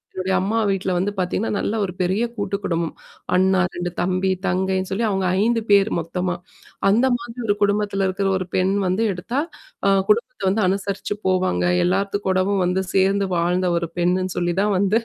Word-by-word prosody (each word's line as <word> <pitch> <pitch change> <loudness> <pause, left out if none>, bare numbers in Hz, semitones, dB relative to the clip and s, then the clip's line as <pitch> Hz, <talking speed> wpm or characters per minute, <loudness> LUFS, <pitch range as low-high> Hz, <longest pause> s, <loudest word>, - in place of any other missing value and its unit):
என்னுடைய 185 0 -1
அம்மா 215 +4 0
வீட்ல 195 -1 -1
வந்து 195 +3 0
பார்த்தீங்கன்னா, 185 +4 -1
நல்ல 215 - -1
ஒரு 180 - -6
பெரிய 190 +6 +1
கூட்டு 200 -1 -2
குடும்பம். 165 -2 -1 0.4
அண்ணா, 190 0 +3
2 175 0 -3
தம்பி, 185 +1 0 0.2
தங்கைன்னு 190 0 0
சொல்லி 215 +4 -1
அவங்க 190 -2 0 0.2
5 230 +1 +2
பேர் 200 +1 +5
மொத்தமா. 180 +2 -2 0.5
"அந்த 235 +6 +4
மாதிரி 235 0 -10
ஒரு 205 - +3
குடும்பத்தில 205 -1 +1
இருக்கிற 195 +1 -1
ஒரு 185 - -3
பெண் 185 +1 +2 0.2
வந்து 185 +5 +1
எடுத்தா, 190 +9 -3 0.5
அ - - +5 0.2
குடும்பத்த 215 0 +1
வந்து 215 +2 +1
அனுசரிச்சு 200 +1 -2
போவாங்க. 185 - +1 0.2
எல்லாத்து 195 +2 0
கூடவும் 190 +1 +1
வந்து 185 +1 0
சேர்ந்து 195 +1 +2
வாழ்ந்த 180 +2 +1
ஒரு 170 -1 -2
பெண்ணுன்னு 185 +1 0
சொல்லி 175 0 0
தான் 210 0 +1
வந்து 200 +3 +3
190 Hz, 170 wpm, -22 LUFS, 185-200 Hz, 0.5 s, பேர்